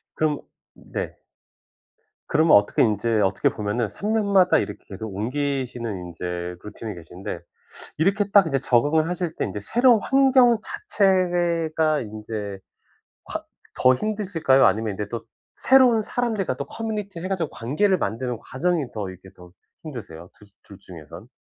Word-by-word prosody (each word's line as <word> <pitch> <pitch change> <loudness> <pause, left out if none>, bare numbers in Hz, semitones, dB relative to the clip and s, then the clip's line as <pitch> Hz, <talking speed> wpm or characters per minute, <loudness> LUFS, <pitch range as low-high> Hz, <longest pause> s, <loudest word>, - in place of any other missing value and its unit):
그럼 155 -2 0 0.3
네. - - -6 1.1
그러면 155 -2 +5
어떻게 100 0 +1
인제 110 +1 +1
어떻게 95 -1 +2
보면은 105 +2 -2
3 200 - -4
년마다 200 -4 +4
이렇게 - - -4
계속 105 +1 -7
옮기시는 120 -4 -3
인제 90 +1 -5
루틴이 105 +1 -7
계신데 90 +2 -7 0.6
이렇게 200 +5 +1
딱 200 -3 +6
이제 135 -4 0
적응을 145 +7 +2
하실 175 -2 -3
때 - - -2
인제 100 +1 -4
새로운 240 - +4
환경 265 -3 +5
자체가 175 - +1
인제 105 -2 -6 0.7
콰 - - -5 0.3
더 130 0 +5
힘드실까요? 180 -7 +2
아니면 110 +2 +2
인제 105 +1 -4
또 115 -1 -5 0.3
새로운 255 -4 +5
사람들과 215 - -1
또 140 - -4
커뮤니티를 210 -6 -5
해 - - -3
가지고 175 -5 -1
관계를 185 - +1
만드는 120 - -2
과정이 160 +6 -1
더 105 -3 -4
이렇게 95 +1 -12
더 90 -1 -15 0.3
힘드세요? 105 - -9 0.3
두 100 - -13
중에선? 85 -6 -12
140 Hz, 315 characters per minute, -23 LUFS, -, 1.1 s, 딱